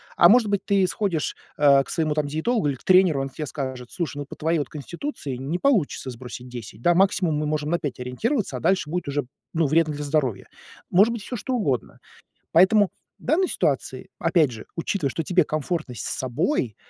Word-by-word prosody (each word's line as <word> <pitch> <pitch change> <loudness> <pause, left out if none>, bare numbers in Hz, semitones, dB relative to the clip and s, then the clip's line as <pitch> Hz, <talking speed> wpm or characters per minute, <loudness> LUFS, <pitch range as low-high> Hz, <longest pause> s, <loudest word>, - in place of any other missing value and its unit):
А 175 - +7
может 235 0 +6
быть, 200 -1 0
ты 195 -2 +3
сходишь, 180 -6 -1 0.2
э, 140 -2 +6
к - - -16
своему 155 -2 0
там 150 -1 -1
диетологу 160 +4 0
или 140 - -1
к - - -19
тренеру, 185 -6 +5
и - - 0
они 135 - -4
тебе 150 +3 -5
скажут: 130 -4 -5
"Слушай, 150 -5 -4
ну, 145 - -4
по - - -10
твоей 165 +1 +1
вот 145 - -3
конституции 150 - -5
не 140 +8 -3
получится 200 - +1
сбросить 125 +1 -9
10. 115 -3 -9
Да, 175 - +4
максимум 185 -3 +2
мы 150 +1 -1
можем 150 0 -1
на 170 - +3
5 145 -6 -4
ориентироваться, 160 - -1
а - - -5
дальше 185 +1 +1
будет 175 -2 -3
уже, 140 -1 -1 0.3
ну, 160 -2 +2
вредно 155 +1 +2
для 145 - -4
здоровья". 140 -8 -1 0.4
Может 200 +6 +5
быть 230 -3 -5
всё 250 - -5
что 255 +3 -2
угодно. 140 - -1 0.5
Поэтому 190 +4 +5 0.3
в - - -20
данной 350 +7 +2
ситуации, - - -1
опять 160 -7 +3
же, 110 -2 -9
учитывая, 165 -2 -1
что 165 - -2
тебе 180 +2 +3
комфортно 155 -2 -3
с - - -8
собой, 125 - -1
155 Hz, 210 wpm, -24 LUFS, 135-190 Hz, 0.5 s, А